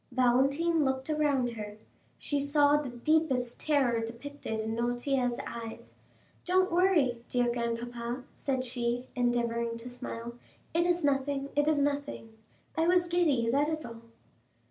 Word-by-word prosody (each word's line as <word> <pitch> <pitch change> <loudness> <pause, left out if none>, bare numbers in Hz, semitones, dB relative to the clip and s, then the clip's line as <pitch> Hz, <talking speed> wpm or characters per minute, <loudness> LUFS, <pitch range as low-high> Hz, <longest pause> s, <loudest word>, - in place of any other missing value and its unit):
Valentine 275 +6 +3
looked 265 +2 -1
around 285 -5 +1
her; 210 -2 -7 0.4
she 290 - -1
saw 285 +1 +4
the 295 -3 -1
deepest 250 -1 +1
terror 260 -7 +2
depicted 235 0 -5
in 220 +1 -2
Noirtier's 245 +1 0
eyes. 230 -1 -7 0.5
"Don't 370 +1 +2
worry, 335 -10 +3
dear 245 -1 +2
grandpapa," 235 +1 -3
said 260 -2 -2
she, 245 0 -2
endeavoring 235 -1 0
to 240 +2 -8
smile; 235 -1 -6 0.4
"it 340 +1 +2
is 350 -1 +1
nothing—it 280 +1 0
is 295 -2 +3
nothing; 280 -6 -3 0.4
I 320 +1 +2
was 355 0 +4
giddy, 320 -9 +2
that 285 +4 +2
is 310 -1 -3
all." 230 -1 -9
260 Hz, 135 wpm, -30 LUFS, 235-295 Hz, 0.5 s, saw